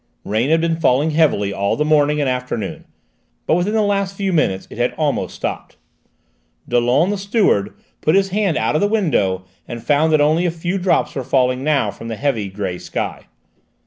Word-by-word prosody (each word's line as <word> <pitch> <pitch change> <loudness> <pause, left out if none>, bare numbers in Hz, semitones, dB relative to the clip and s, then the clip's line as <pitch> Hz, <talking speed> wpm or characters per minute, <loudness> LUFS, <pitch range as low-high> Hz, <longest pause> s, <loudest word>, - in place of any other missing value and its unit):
Rain 110 +6 0
had 160 +1 +3
been 165 -1 0
falling 145 +1 +2
heavily 145 -11 +2
all 100 +1 0
the 150 - 0
morning 150 -1 +3
and 145 - +1
afternoon, 125 -5 -3 0.6
but - - +1
within 180 +6 +1
the 220 - +3
last 200 -1 0
few 195 -1 -1
minutes 95 - +1
it - - -9
had 120 - +1
almost 150 -3 -1
stopped. - - -5 0.9
Dollon, 125 +9 +2
the 205 - -2
steward, 195 - +1 0.3
put 155 - +2
his 195 0 +3
hand 195 -4 0
out - - 0
of 155 - +1
the 205 - +3
window 120 - 0 0.2
and 120 -2 -7
found 150 +2 +2
that 155 - +4
only 155 +4 +3
a - - +2
few 175 +3 -3
drops 180 0 +1
were 135 - -3
falling 130 0 +1
now 140 -8 +1
from 115 +3 -10
the 115 - -4
heavy 115 -6 -1
grey 95 -2 -4
sky. - - -5
150 Hz, 195 wpm, -19 LUFS, 120-175 Hz, 0.9 s, that